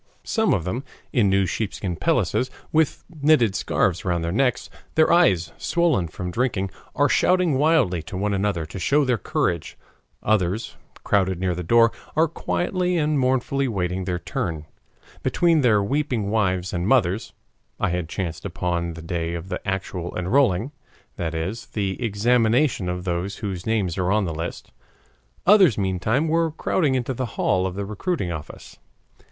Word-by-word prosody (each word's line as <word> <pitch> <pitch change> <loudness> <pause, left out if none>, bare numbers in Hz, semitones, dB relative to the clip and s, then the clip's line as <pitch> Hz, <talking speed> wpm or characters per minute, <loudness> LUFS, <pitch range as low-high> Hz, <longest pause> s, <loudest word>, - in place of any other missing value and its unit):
Some 220 -1 +1
of 90 - +1
them, 115 +10 -3 0.3
in 110 -6 +3
new 95 0 +3
sheepskin 95 0 -3
pelisses, 125 +9 +1 0.2
with 160 -2 +1 0.2
knitted 140 -9 +4
scarves 95 -2 0
round 85 -2 0
their 85 - -1
necks, 125 +5 +1 0.3
their 160 +1 +4
eyes 90 - +3
swollen 165 - +1
from 90 +3 -6
drinking, 100 -4 -1 0.2
are 145 - +4
shouting 180 +1 +3
wildly 140 - +3
to - - -5
one 100 +1 0
another 95 -4 0
to 85 +5 -8
show 145 +10 +2
their 125 -4 +1
courage; 85 -3 -1 0.5
others, 105 0 0 0.3
crowded 95 -3 +1
near 90 -1 0
the 90 - -4
door, 115 +6 +4 0.2
are 160 +1 +4
quietly 180 +2 -1
and 150 -2 +1
mournfully 130 +1 +1
waiting 95 -4 -2
their 90 -1 -1
turn, 80 -2 -4 0.6
between 170 -3 +2
their 110 -6 +4
weeping 125 -4 -1
wives 95 -4 0
and 90 +1 -1
mothers 110 -5 +2 0.5
(I - - +1
had 90 -2 -2
chanced 85 -4 -4
upon 85 -2 -2
the 85 - -9
day 85 0 -2
of 85 +2 -7
the 90 - -3
actual 95 -2 -3
enrolling, 105 +4 +2 0.5
that 80 -1 -3
is, 95 +8 -4
the 100 +2 -3
examination 115 0 +2
of 90 0 -3
those 90 +2 -2
whose 95 -4 -5
names 100 -6 0
are 90 +1 +1
on 105 -1 +2
the 85 - -3
list); 80 +2 -6 0.7
others 190 - +6
meantime 100 - 0
were 165 +1 +2
crowding 150 -2 0
into 130 +1 -1
the 130 0 -3
hall 95 0 +2
of 95 - -6
the 100 0 -3
recruiting 105 - -2
office. 80 -3 -9
100 Hz, 160 wpm, -23 LUFS, 90-130 Hz, 0.7 s, others